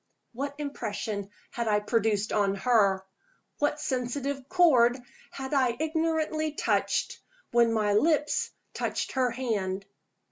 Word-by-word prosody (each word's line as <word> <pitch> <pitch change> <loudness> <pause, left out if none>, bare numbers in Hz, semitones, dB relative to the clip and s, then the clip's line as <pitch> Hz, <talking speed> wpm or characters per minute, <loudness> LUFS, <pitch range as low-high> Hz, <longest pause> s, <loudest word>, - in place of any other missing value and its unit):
What 280 +4 -4
impression 215 -8 -4 0.2
had 235 -1 -3
I 210 -1 +3
produced 215 -1 0
on 200 -2 +2
her? 200 -3 +2 0.5
What 295 0 +1
sensitive 270 0 -3
chord 260 -9 +5 0.3
had 265 +1 -6
I 255 -4 +2
ignorantly 315 -1 0
touched, - - 0 0.3
when 235 -1 +4
my 210 -2 +1
lips 300 +6 +2 0.2
touched - - -2
her 255 -2 +1
hand? 205 -6 -2
245 Hz, 115 wpm, -28 LUFS, 210-290 Hz, 0.5 s, chord